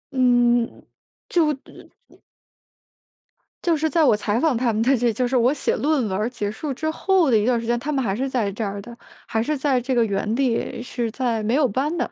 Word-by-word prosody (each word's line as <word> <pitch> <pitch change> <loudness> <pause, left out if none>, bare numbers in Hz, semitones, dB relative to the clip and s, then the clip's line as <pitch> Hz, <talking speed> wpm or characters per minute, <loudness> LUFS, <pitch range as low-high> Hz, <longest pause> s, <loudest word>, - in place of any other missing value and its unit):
嗯， 245 -2 +2 0.4
就 320 -4 +2
的 270 - -17 0.2
嗯。 - - -22 1.4
就 335 -2 +2
是 315 +1 0
在 330 -1 +2
我 240 -7 +5
采 210 +1 -1
访 315 -5 +2
他 235 -2 +1
们 215 - 0
的 265 +3 +3
这 240 0 +1
就 250 +4 0
是 255 +1 +1
我 245 +4 +3
写 275 - -1
论 290 -3 +1
文 190 - -2
儿 220 +3 0
结 210 -4 -3
束 275 +5 -4
之 315 +4 -2
后 355 -4 +2
的 220 - +5
一 210 - +1
段 245 -2 +2
时 230 - -6
间， 240 0 0
他 300 +3 -3
们 265 -2 0
还 195 - -1
是 265 +6 -2
在 225 -6 -1
这 215 +3 -4
儿 200 0 -4
的， 235 +3 -11 0.3
还 220 - -1
是 295 +5 -1
在 265 -2 +1
这 255 +1 -2
个 235 - +4
原 210 +2 -1
地， 245 -2 -1
是 240 -2 -3
在 230 -1 -1
没 220 +4 0
有 295 -1 +3
搬 280 +10 -1
的。 - - -2
245 Hz, 255 characters per minute, -22 LUFS, 225-275 Hz, 1.4 s, 我